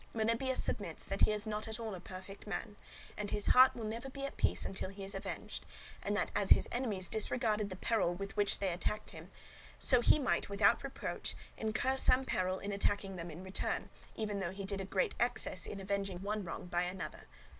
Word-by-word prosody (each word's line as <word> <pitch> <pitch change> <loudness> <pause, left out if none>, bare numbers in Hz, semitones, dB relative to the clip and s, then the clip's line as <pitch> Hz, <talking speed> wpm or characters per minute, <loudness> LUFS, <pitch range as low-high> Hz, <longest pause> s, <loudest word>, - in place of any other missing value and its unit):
Melibœus 230 +4 +1
submits - - -1
that - - -3
he - - +1
is 210 +1 0
not 215 0 -2
at 220 +1 -4
all 225 -2 -3
a 185 - -5
perfect 190 +3 -9
man, 210 0 -3 0.4
and 210 -1 -3
his 205 - 0
heart 255 +1 +7
will 235 - -5
never 230 +5 -4
be 275 +1 -5
at 275 - -5
peace - - +2
until 190 -1 -3
he 195 0 -8
is 195 - -3
avenged; - - -5 0.4
and 205 +1 0
that - - 0
as 200 -1 +1
his - - +7
enemies 215 -7 -1
disregarded 215 -1 +1
the 185 - -5
peril 190 -3 +1
when 195 +2 -5 0.3
they 190 -3 +1
attacked 210 +4 -2
him, - - -10 0.5
so 250 -3 +5
he 245 - +6
might, 265 -8 +1
without 200 +4 +4
reproach, 275 -1 -4 0.2
incur 235 +4 0
some 260 0 +5
peril 185 -5 0
in 200 +2 -4
attacking 200 -1 0
them 170 -1 -5
in 170 +3 -8
return, 190 0 -2 0.2
even 210 -2 -2
though 190 -3 -1
he 195 +2 -6
did 195 0 -1
a - - -4
great 425 - +1
excess - - +1
in 200 - -5
avenging 195 -1 -2
one 210 +1 -1
wrong 175 - -5
by 175 -1 0
another. 180 +1 -4
205 Hz, 210 wpm, -35 LUFS, 190-225 Hz, 0.5 s, heart